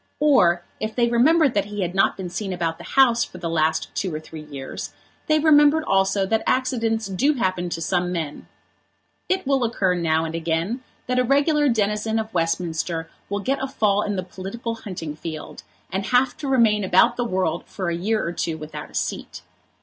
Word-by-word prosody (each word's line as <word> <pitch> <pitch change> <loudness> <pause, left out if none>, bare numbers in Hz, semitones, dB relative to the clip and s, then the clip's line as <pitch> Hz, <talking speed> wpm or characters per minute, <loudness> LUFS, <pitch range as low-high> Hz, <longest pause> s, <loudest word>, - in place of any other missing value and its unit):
Or 180 -13 +4 0.2
if 215 0 -4
they 240 -1 +3
remembered 275 +4 +4
that 200 - +1
he 205 -1 -3
had 175 0 -3
not 195 - +2
been 185 -3 -5
seen 195 +1 -3
about 165 -2 -2
the - - -9
House 240 -4 +5
for - - -9
the 170 - -4
last 160 -1 0
two 190 - -2
or 155 - -3
three 155 0 -10
years 140 -3 -7 0.3
they 310 - +4
remembered 305 0 +5
also 195 -4 +2
that 220 +3 +1
accidents 230 -4 +1
do 240 +11 +1
happen 185 -6 -1
to 165 - -4
some 180 +1 0
men. 160 -4 -4 0.8
It 375 -2 0
will 270 -1 +2
occur 205 -5 +1
now 165 -2 +1
and 160 - -5
again 165 +9 -2 0.2
that 250 0 0
a - - +4
regular 290 +3 +3
denizen 215 0 0
of 220 0 -3
Westminster 165 -1 -1 0.2
will 200 0 -2
get 270 +5 -1
a 270 - -1
fall 210 -6 +1
in 205 -1 -2
the 185 - -2
political 195 +6 -6
hunting 180 -9 -6
field, 155 0 -7 0.3
and 195 +1 -2
have 250 +2 +3
to 300 - -5
remain 225 -6 +3
about 185 0 +4
the 245 - -1
world 185 -6 -1
for 185 -3 -3
a - - -1
year 215 +6 0
or 170 - -2
two 165 -1 -2
without 155 0 -8
a - - -15
seat. - - -4
200 Hz, 200 wpm, -23 LUFS, 170-245 Hz, 0.8 s, House